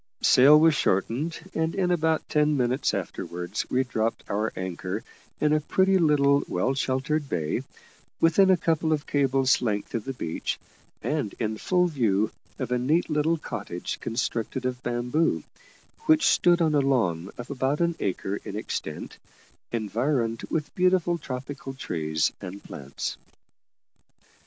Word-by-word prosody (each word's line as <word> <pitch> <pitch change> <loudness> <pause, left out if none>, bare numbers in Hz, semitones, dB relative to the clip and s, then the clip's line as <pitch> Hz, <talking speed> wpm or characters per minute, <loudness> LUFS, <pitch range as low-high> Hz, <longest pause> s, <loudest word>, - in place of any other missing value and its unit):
Sail 145 +4 +7
was 160 0 +5
shortened, 135 - 0
and 160 0 -1
in 185 -2 +1
about 160 -2 +1
ten 150 -1 +2
minutes 125 +2 +1
afterwards 90 +4 -4
we 130 +1 +2
dropped 115 -3 -2
our 105 +2 -1
anchor 95 +2 -4 0.4
in 150 0 +3
a 155 - +4
pretty 190 +4 +3
little 140 -3 +4
well 105 +9 0
sheltered 135 +2 -1
bay, 80 -3 -1 0.6
within 180 +4 +5
a 185 - +6
couple 160 -1 +1
of 150 -1 -2
cables' 135 -2 +2
length 105 -4 -2
of 115 -3 -2
the 135 - -3
beach, 85 -10 -3 0.5
and 145 -9 -1
in 110 -1 -1
full 180 - +2
view 110 - +1 0.3
of 130 -3 -4
a 125 - +2
neat 155 +7 +1
little 155 +2 +2
cottage 100 - -5
constructed 115 +2 -2
of 125 0 -2
bamboo, 125 +7 0 0.6
which 315 0 +5
stood 175 -1 +4
on 155 -2 +2
a 145 - +4
lawn 95 -11 +1
of 120 +3 -7
about 135 +2 0
an 170 -1 +1
acre 95 +1 -2
in 100 - -6
extent, 105 - -5 0.5
environed 115 +1 0
with 150 -2 -2
beautiful 180 -2 +2
tropical 135 0 -6
trees 80 -9 -1
and 95 +2 -8
plants. 70 0 -6
135 Hz, 145 wpm, -26 LUFS, 110-155 Hz, 0.6 s, Sail